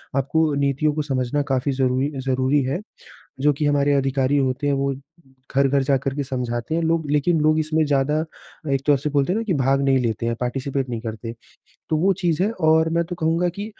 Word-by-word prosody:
आपको 150 +3 +1
नीतियों 140 +1 +1
को 155 - -1
समझना 135 -1 -1
काफ़ी 130 +2 0
ज़रूरी 130 +1 0
अ, - - -4
ज़रूरी 130 +2 +1
है। 135 +7 -2 0.6
जो 150 +2 +4
कि 145 +2 -3
हमारे 145 0 +2
अधिकारी 135 0 +1
होते 135 +1 -1
हैं, 140 - +2
वो 140 0 -1 0.6
घर-घर 140 0 +3
जाकर 135 0 0
के 145 - -2
समझाते 125 0 -3
हैं 170 - 0
लोग 160 -2 0
लेकिन 150 +3 +2
लोग 155 +1 +3
इसमें 155 0 +1
ज़्यादा 145 +2 +1 0.5
एक 135 -1 0
तौर 145 -2 +4
से 150 +3 -3
बोलते 145 +3 +1
हैं - - 0
ना - - -1
कि 210 - 0
भाग 135 -1 +2
नहीं 135 -1 +3
लेते 115 -2 -1
हैं, 115 - 0
पार्टिसिपेट 135 +2 -2
नहीं 120 -2 -4
करते। 115 0 -6 0.6
तो 155 - +2
वो 185 +5 +3
चीज़ 175 -1 +1
है 205 - +1 0.2
और 160 0 +4
मैं 170 0 +1
तो 175 +1 -6
कहूँगा 165 +1 +1
कि 200 +4 -5
140 Hz, 215 wpm, -22 LUFS, 130-155 Hz, 0.6 s, जो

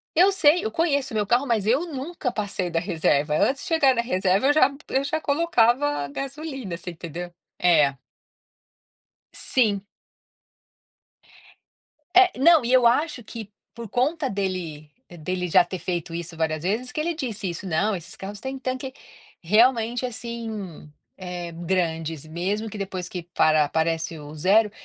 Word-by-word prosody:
Eu 365 +5 +6
sei, 350 0 +4
eu 440 - -1
conheço 285 -7 0
o - - -4
meu 210 -1 +1
carro, 240 +6 +2
mas 225 -5 0
eu 265 +9 +2
nunca 295 -2 -4
passei 200 -5 -3
da 165 - +1
reserva. 160 -4 +1
Antes 270 - +1
de - - -7
chegar 320 -6 +4
na 235 - +2
reserva, 195 0 +1
eu 290 - +5
já 280 -2 +5 0.2
eu 270 - +1
já 315 +3 -2
colocava 280 - +2
gasolina, 270 - -5
você 180 - -7
entendeu? 170 +1 -7 0.3
É. 150 -6 +4 1.4
Sim. 215 -6 +1 2.3
É, 370 0 +7
não, 320 -2 +6
e 245 - +1
eu 250 -2 +6
acho 275 +1 +1
que 220 -1 -9 0.2
por 235 -1 -8
conta 270 - 0
dele 185 -7 -4 0.2
dele 180 +2 -4
já 180 +1 +5
ter 185 - -6
feito 170 -2 -3
isso 170 0 -6
várias 160 -1 -1
vezes, 225 +7 -1
que - - -4
ele 335 +2 -1
disse 220 - -3
isso: 170 +3 -6
"Não, 195 +5 +1
esses 170 -3 -8
carros 200 +1 -8
têm 265 +3 -5
tanque 260 0 -4 0.5
realmente 230 +5 +3
assim, 225 -9 -6 0.3
eh, 180 -2 -6
grandes, 165 -3 -2
mesmo 195 +7 -2
que, 210 - -8
depois 185 -2 -5
que 180 -2 -6
para 155 -2 +3
aparece 160 +1 -1
o 150 0 -10
0." 200 +7 +3
210 Hz, 155 wpm, -24 LUFS, 175-265 Hz, 2.3 s, É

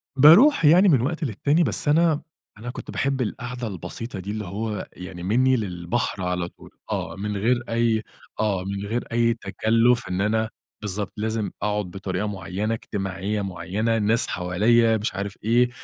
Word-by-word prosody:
باروح 165 - +7
يعني 180 +7 +7
من 135 -7 +4
وقت 160 +5 -2
للتاني، 145 - +1
بس 115 +3 -1
أنا 160 0 +3 0.4
أنا 120 +3 -7
كنت - - -7
باحب 135 -1 -1
القعدة 125 +1 -4
البسيطة 100 +3 -6
دي، 100 +3 -5
اللي 105 -1 -4
هو 105 +2 -4
يعني 90 -1 -8
مني 130 +6 +3
للبحر 95 0 -2
على 90 -1 -1
طول، - - -17 0.2
آه، - - -3
من 105 +1 -3
غير 120 +4 +1
أي 115 -1 +1 0.4
آه، 100 -4 0
من 100 +1 -4
غير 115 +4 -2
أي 115 0 +3
تكلُّف، 115 +3 +1
إن 90 +1 -1
أنا 110 +2 +1 0.3
بالضبط، 105 0 -3
لازم 110 0 -2
أقعد 105 -1 0
بطريقة 95 +1 -3
معيّنة، 100 +2 -3
اجتماعية 100 -1 -3
معيّنة، 100 +4 -1
الناس 110 +2 +2
حواليّا 110 +6 +3
مش 105 -2 -3
عارف 100 0 -4
إيه، 120 +3 +3
110 Hz, 165 wpm, -24 LUFS, 100-120 Hz, 0.4 s, باروح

